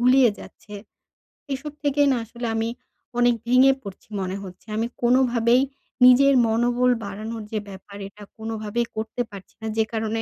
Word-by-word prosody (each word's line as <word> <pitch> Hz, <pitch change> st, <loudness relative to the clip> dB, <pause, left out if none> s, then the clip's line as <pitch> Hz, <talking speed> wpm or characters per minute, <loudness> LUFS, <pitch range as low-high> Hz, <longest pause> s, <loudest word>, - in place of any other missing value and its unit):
গুলিয়ে 250 Hz, -1 st, +5 dB
যাচ্ছে। 210 Hz, -, -12 dB, 0.8 s
এসব 285 Hz, +2 st, -5 dB
থেকেই 285 Hz, 0 st, +3 dB
না 255 Hz, -, +2 dB
আসলে 235 Hz, +1 st, -6 dB
আমি 225 Hz, +1 st, 0 dB, 0.5 s
অনেক 245 Hz, 0 st, +4 dB
ভেঙে 255 Hz, +2 st, +6 dB
পড়ছি 200 Hz, +1 st, -11 dB
মনে 185 Hz, 0 st, -3 dB
হচ্ছে, 185 Hz, +3 st, -12 dB
আমি 225 Hz, +2 st, 0 dB, 0.2 s
কোনোভাবেই 240 Hz, 0 st, +4 dB, 0.4 s
নিজের 275 Hz, +2 st, +7 dB
মনোবল 240 Hz, +2 st, +2 dB
বাড়ানোর 215 Hz, +3 st, -6 dB
যে 215 Hz, -, -1 dB
ব্যাপার, 195 Hz, +1 st, -11 dB
এটা 205 Hz, +1 st, -14 dB
কোনোভাবেই 220 Hz, +1 st, -2 dB
করতে 220 Hz, +3 st, -3 dB
পারছি 195 Hz, -2 st, -11 dB
না 220 Hz, -, -4 dB
যে 220 Hz, -, +4 dB
কারণে 220 Hz, 0 st, -1 dB
230 Hz, 155 wpm, -24 LUFS, 215-250 Hz, 0.8 s, নিজের